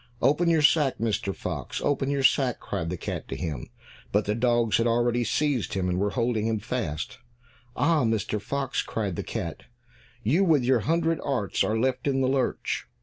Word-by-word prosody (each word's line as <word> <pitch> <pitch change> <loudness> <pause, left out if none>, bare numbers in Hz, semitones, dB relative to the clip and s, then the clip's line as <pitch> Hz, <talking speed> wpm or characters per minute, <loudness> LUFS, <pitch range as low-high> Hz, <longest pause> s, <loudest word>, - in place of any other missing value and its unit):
"Open 150 +7 +3
your 160 -2 +3
sack, 145 -3 +4
Mr. 105 -3 -1
Fox, - - -4
open 140 -1 0
your 140 -1 0
sack," 130 -2 +3
cried 85 -5 -3
the 90 - -3
cat - - -5
to - - -4
him, 75 -3 -4 0.4
but 105 +1 +2
the 105 - 0
dogs 120 -1 +2
had 115 - +2
already 120 +1 +2
seized 140 -4 0
him, 95 -1 0
and 90 0 0
were 100 +1 +1
holding 115 -1 0
him 110 -1 +1
fast. 110 - -4 0.6
"Ah, 160 -4 +3
Mr. 110 -2 0
Fox," 135 +4 -2
cried 100 -5 -3
the - - -2
cat. - - -5 0.6
"You 155 - +3
with 155 -8 +4
your 125 0 +3
hundred 165 +5 +1
arts 130 -8 0
are 110 - 0
left 130 +3 0
in 135 -1 +2
the 130 - +2
lurch! 130 0 -1
120 Hz, 190 wpm, -26 LUFS, 105-140 Hz, 0.6 s, sack